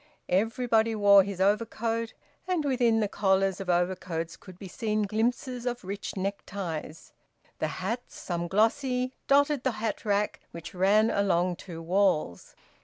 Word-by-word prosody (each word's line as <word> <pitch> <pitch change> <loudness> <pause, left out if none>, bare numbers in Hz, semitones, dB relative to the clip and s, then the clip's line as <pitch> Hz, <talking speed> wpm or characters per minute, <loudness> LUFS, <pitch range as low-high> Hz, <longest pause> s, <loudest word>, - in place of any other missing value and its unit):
Everybody 225 +3 +2
wore 200 -1 +7
his 195 -1 -5
overcoat, 225 +3 0 0.3
and 355 -5 0
within 240 -5 +2
the 210 - +1
collars 195 -1 +1
of 190 - -6
overcoats 175 -2 -1
could 185 -2 -14
be 195 - -9
seen 215 +2 -1
glimpses 240 +4 -1
of 245 0 -3
rich 200 +1 -5
neckties; 185 -5 -5 0.5
the 155 - 0
hats, 205 - -5
some 175 -1 -3
glossy, 250 +6 +1
dotted 285 0 +3
the 260 - +1
hat 220 0 -3
rack 205 0 0
which 170 0 -9
ran 205 +5 +3
along 180 -3 +1
two 165 -3 -9
walls. 175 - 0
205 Hz, 140 wpm, -28 LUFS, 185-230 Hz, 0.5 s, wore